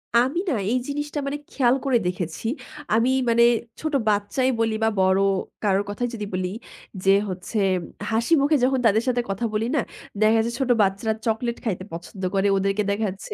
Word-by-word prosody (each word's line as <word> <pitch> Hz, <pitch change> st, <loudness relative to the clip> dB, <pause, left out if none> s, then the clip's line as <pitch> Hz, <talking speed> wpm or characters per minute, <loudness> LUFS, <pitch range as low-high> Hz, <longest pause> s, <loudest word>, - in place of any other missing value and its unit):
আমি 255 Hz, +8 st, +3 dB
না -, -, +1 dB, 0.2 s
এই 255 Hz, -, +2 dB
জিনিসটা 295 Hz, +1 st, -3 dB
মানে 285 Hz, +1 st, -2 dB
খেয়াল 250 Hz, -2 st, +3 dB
করে 255 Hz, -3 st, +3 dB
দেখেছি। 180 Hz, +1 st, -4 dB, 0.5 s
আমি 230 Hz, +3 st, +3 dB, 0.2 s
মানে 235 Hz, 0 st, +5 dB, 0.4 s
ছোট 310 Hz, -1 st, -3 dB, 0.2 s
বাচ্চাই 210 Hz, +6 st, +1 dB
বলি 225 Hz, -1 st, +1 dB
বা 220 Hz, -, +4 dB
বড় 190 Hz, +1 st, +4 dB, 0.4 s
কারো 200 Hz, -1 st, +3 dB
কথাই 245 Hz, +4 st, -2 dB
যদি 210 Hz, -3 st, -4 dB
বলি। 185 Hz, 0 st, -1 dB, 0.5 s
যে 195 Hz, -, +5 dB, 0.2 s
হচ্ছে 185 Hz, +4 st, -4 dB, 0.5 s
হাসিমুখে 280 Hz, +6 st, +3 dB
যখন 265 Hz, +1 st, +3 dB
তাদের 220 Hz, +1 st, +4 dB
সাথে 245 Hz, -1 st, +2 dB
কথা 195 Hz, +4 st, -2 dB
বলি 215 Hz, +1 st, 0 dB
না -, -, +3 dB, 0.4 s
দেখা 220 Hz, +1 st, +5 dB
যায় 235 Hz, -, -3 dB
ছোট 260 Hz, -2 st, -1 dB
বাচ্চারা 200 Hz, +3 st, +1 dB
চকোলেট 235 Hz, +1 st, -1 dB
খাইতে 190 Hz, -4 st, -2 dB
পছন্দ 175 Hz, +3 st, -8 dB
করে, 195 Hz, +1 st, +2 dB
ওদেরকে 195 Hz, +2 st, +1 dB
দেখা 215 Hz, +2 st, 0 dB
যাচ্ছে 195 Hz, -, -9 dB
225 Hz, 175 wpm, -24 LUFS, 195-250 Hz, 0.5 s, মানে